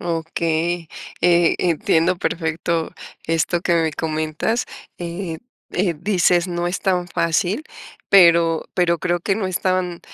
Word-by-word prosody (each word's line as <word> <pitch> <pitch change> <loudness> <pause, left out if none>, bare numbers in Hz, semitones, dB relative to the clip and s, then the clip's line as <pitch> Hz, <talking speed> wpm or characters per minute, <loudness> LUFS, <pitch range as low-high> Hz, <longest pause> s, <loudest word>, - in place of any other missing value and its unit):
Okey, 165 0 -2 0.3
eh, 175 -1 +4
entiendo, 170 +1 +2
perfecto 165 -1 -2 0.3
esto 165 +2 0
que 175 0 +1
me 165 -2 +1
comentas, 155 +9 -2 0.3
eh 170 -1 -5 0.3
eh, 180 -1 0
dices: 180 -1 +2
"No 175 0 -2
es 175 +2 -2
tan 180 -2 0
fácil", 175 - 0 0.4
pero 170 -3 +5
pero 170 -2 +2
creo 175 +1 -1
que, 195 +3 0
no 200 -1 -2
es 185 -1 -2
tan 185 -2 -1
170 Hz, 130 wpm, -21 LUFS, 165-180 Hz, 0.4 s, pero